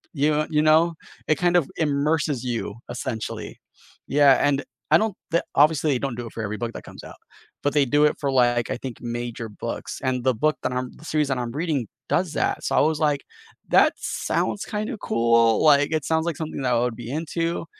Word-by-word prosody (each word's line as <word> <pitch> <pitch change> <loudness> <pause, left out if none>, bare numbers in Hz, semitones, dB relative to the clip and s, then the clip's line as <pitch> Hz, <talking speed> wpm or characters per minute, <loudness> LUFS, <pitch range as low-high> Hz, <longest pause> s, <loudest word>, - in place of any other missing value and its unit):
Y 150 +2 +1
you 150 0 +3
know? 160 +2 +4 0.3
It 155 - +2
kind 175 0 +4
of 155 - +1
immerses 145 -3 0
you, 115 -4 -3
essentially. 120 -2 -5 0.5
Yeah, 140 -1 +6
and 140 -1 +1 0.3
I - - +9
don't 215 -1 -1 0.2
the 170 - +2
obviously 150 +1 +4
they 125 - 0
don't 130 -4 -3
do 120 - -5
it - - -12
for 110 - -4
every 105 +1 -3
book 115 -1 -4
that - - -8
comes - - -11
out, - - -11 0.5
but 145 - +1
they 145 -2 +4
do 145 +4 +3
it - - +2
for, 140 -2 -1
like, 120 -2 +2
I - - -2
think 130 -2 -7
major 120 -1 -4
books, 105 - -6
and 125 -2 -1
the 130 -3 +2
book 155 +7 +1
that - - -1
I'm 125 0 -2
the 155 - -14
series 150 -2 +1
that 135 - 0
I'm 120 -1 -3
reading 145 - -1 0.2
does 175 -3 0
that, - - -1
so - - -2
I - - +6
was 155 0 +1
like, 150 -2 +1 0.5
"That - - +5
sounds 200 - -2
kinda 215 +3 -3
cool, 115 - +3
like, 145 -1 +5
it 155 -3 -1
sounds 160 0 +1
like 165 - -2
something 155 -3 -5
that 125 -1 +1
I 115 - +3
would 120 -1 -1
be 120 0 -7
into." 165 +2 -2
140 Hz, 220 wpm, -24 LUFS, 120-155 Hz, 0.5 s, I